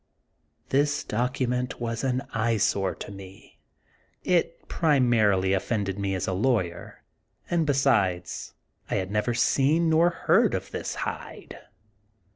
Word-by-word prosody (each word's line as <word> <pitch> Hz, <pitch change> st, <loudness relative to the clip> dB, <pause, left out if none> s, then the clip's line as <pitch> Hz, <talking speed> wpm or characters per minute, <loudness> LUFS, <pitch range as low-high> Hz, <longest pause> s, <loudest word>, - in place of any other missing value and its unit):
This 145 Hz, +2 st, +1 dB
document 125 Hz, +1 st, -2 dB
was 115 Hz, 0 st, -3 dB
an 130 Hz, 0 st, 0 dB
eyesore 110 Hz, -4 st, +1 dB
to -, -, -8 dB
me. 95 Hz, -1 st, -13 dB, 0.6 s
It 175 Hz, -2 st, 0 dB
pri 155 Hz, -4 st, +2 dB
marily 105 Hz, -7 st, +3 dB
offended 100 Hz, -1 st, -2 dB
me 100 Hz, -1 st, -1 dB
as 95 Hz, -, -2 dB
a 95 Hz, -, -2 dB
lawyer, 95 Hz, -5 st, -1 dB, 0.5 s
and 165 Hz, -3 st, +1 dB
besides 100 Hz, -11 st, 0 dB, 0.3 s
I -, -, -1 dB
had 95 Hz, -1 st, -2 dB
never 105 Hz, +3 st, 0 dB
seen 150 Hz, +7 st, +2 dB
nor 165 Hz, +2 st, +5 dB
heard 175 Hz, -, +2 dB
of -, -, -5 dB
this -, -, -4 dB
Hyde. -, -, -7 dB
115 Hz, 125 wpm, -26 LUFS, 95-135 Hz, 0.6 s, nor